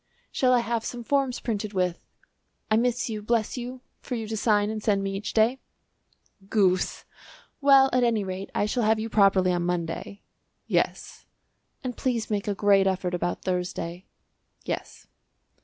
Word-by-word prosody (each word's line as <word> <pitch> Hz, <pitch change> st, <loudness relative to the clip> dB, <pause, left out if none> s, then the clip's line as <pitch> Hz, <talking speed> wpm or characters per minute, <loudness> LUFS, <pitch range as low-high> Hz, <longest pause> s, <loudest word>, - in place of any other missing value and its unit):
"Shall 255 Hz, -1 st, +2 dB
I 245 Hz, -1 st, +4 dB
have 235 Hz, -1 st, -2 dB
some 240 Hz, -1 st, -5 dB
forms 270 Hz, -1 st, 0 dB
printed 215 Hz, -2 st, -3 dB
with 180 Hz, -2 st, -1 dB, 0.7 s
'I 215 Hz, -, +5 dB
miss 245 Hz, +1 st, +1 dB
you, 215 Hz, -2 st, -4 dB
bless 220 Hz, 0 st, 0 dB
you,' 250 Hz, 0 st, -6 dB, 0.2 s
for 250 Hz, -, -5 dB
you 225 Hz, -2 st, -4 dB
to 220 Hz, -, -2 dB
sign 210 Hz, -1 st, +2 dB
and 220 Hz, -1 st, -4 dB
send 200 Hz, -2 st, +1 dB
me 195 Hz, 0 st, -2 dB
each 200 Hz, +1 st, -4 dB
day." 230 Hz, +4 st, +3 dB, 0.9 s
"Goose!" 185 Hz, -4 st, +1 dB, 0.6 s
"Well, 275 Hz, -1 st, +7 dB
at 250 Hz, 0 st, +3 dB
any 230 Hz, -3 st, +2 dB
rate, 190 Hz, 0 st, -5 dB
I -, -, +2 dB
shall 240 Hz, +4 st, -1 dB
have 220 Hz, 0 st, +3 dB
you 225 Hz, +1 st, -3 dB
properly 195 Hz, -3 st, +4 dB
on 175 Hz, -, 0 dB
Monday." 175 Hz, +3 st, -3 dB, 0.4 s
"Yes." -, -, -2 dB, 0.6 s
"And 250 Hz, -2 st, -4 dB
please 240 Hz, -5 st, -2 dB
make 205 Hz, -1 st, -1 dB
a 205 Hz, -, 0 dB
great 200 Hz, -1 st, +4 dB
effort 185 Hz, -1 st, -1 dB
about 175 Hz, 0 st, -2 dB
Thursday." 180 Hz, -1 st, -3 dB, 0.6 s
"Yes." -, -, -5 dB
215 Hz, 165 wpm, -26 LUFS, 195-235 Hz, 0.9 s, Well